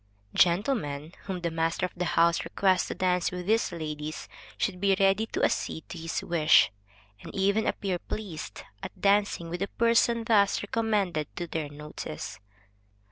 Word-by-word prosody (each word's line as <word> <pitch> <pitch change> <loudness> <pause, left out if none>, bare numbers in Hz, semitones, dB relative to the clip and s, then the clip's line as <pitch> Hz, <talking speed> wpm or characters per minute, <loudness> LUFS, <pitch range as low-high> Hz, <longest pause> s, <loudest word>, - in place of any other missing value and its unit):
Gentlemen 170 - +1
whom 185 -3 -4
the 170 -1 -1
master 165 +2 0
of 180 - -6
the 180 0 -2
house 170 0 +4
requests 190 -2 +2
to - - -4
dance 180 -1 +1
with 180 -1 -6
these 220 +2 +2
ladies, 155 -2 -5 0.3
should 200 -6 -1
be 200 -1 +4
ready 195 +3 +3
to - - -3
accede 160 - -1
to - - -7
his 165 0 -3
wish, 160 -7 +5 0.5
and - - -9
even 200 +3 +2
appear 185 -3 -1
pleased 185 -7 -6 0.2
at - - -8
dancing 200 -4 +2
with 175 +2 -5
a 195 - 0
person 230 +1 +2
thus 205 -4 +3
recommended 205 -8 0
to 175 - -3
their 160 -3 -3
notice. 145 - -7
180 Hz, 160 wpm, -28 LUFS, 165-200 Hz, 0.5 s, wish